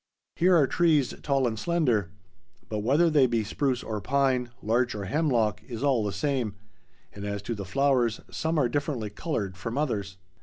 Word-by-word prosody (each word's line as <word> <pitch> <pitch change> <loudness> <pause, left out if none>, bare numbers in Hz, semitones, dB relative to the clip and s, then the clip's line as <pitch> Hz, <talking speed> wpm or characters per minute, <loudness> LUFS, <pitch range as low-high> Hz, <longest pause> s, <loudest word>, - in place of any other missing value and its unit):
There 180 +1 +5
are 155 -4 +5
trees 155 -3 +2
tall 135 -2 +1
and 110 -2 -3
slender, 125 - +1 0.6
but 105 - -2
whether 140 +11 +3
they 145 -5 +4
be 115 -2 0
spruce 130 +4 -1
or 110 -2 -4
pine, 130 +2 +1
larch 120 +3 +1
or 105 - -4
hemlock, 115 - +1
is 120 0 -5
all 135 -6 +2
the 105 - -1
same; 130 -6 -1 0.6
and 100 - -8
as 100 0 -4
to 115 - -3
the 100 -3 -6
flowers—some 135 - 0
are 140 -5 +3
differently 125 -5 -2
colored 105 - -3
from 115 +8 -4
others. 100 -10 -2
125 Hz, 175 wpm, -27 LUFS, 105-145 Hz, 0.6 s, There